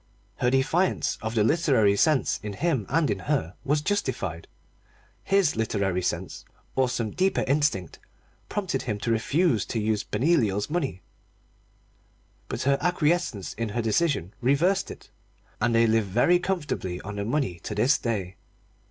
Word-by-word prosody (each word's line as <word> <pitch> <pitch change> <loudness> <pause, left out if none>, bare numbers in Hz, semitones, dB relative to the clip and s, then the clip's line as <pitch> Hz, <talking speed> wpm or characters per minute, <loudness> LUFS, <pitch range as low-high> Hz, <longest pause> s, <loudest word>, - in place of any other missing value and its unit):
Her 125 - +2
defiance 140 +8 +1
of 110 +1 -4
the 110 - +3
literary 125 -7 +3
sense 135 +2 +2
in 105 0 -5
him 135 - -1
and 160 +1 +2
in 100 - -2
her 85 -2 -1
was 145 +2 +1
justified. 130 - -2 0.8
His 195 -6 +2
literary 100 -5 0
sense, 90 - -3 0.3
or 130 -1 +2
some 115 -3 -2
deeper 190 +1 +1
instinct, 140 - 0 0.5
prompted 185 -10 -2
him 105 -4 -3
to 115 - -1
refuse 130 - +2
to 115 - -2
use 110 0 0
Benoliel's 120 - +1
money 140 - -2 1.4
but - - -4
her 140 +1 +2
acquiescence 165 - 0
in 115 -1 -3
his 115 +3 -2
decision 110 - 0
reversed 170 +10 +2
it. - - -11 0.5
And 115 +1 +2
they 115 0 +5
live 110 -1 +2
very 120 - +3
comfortably 150 - -3
on 105 +1 -7
the 100 - -2
money 115 - -1
to - - -6
this 135 +5 +3
day. 100 -6 -3
120 Hz, 150 wpm, -26 LUFS, 105-155 Hz, 1.4 s, they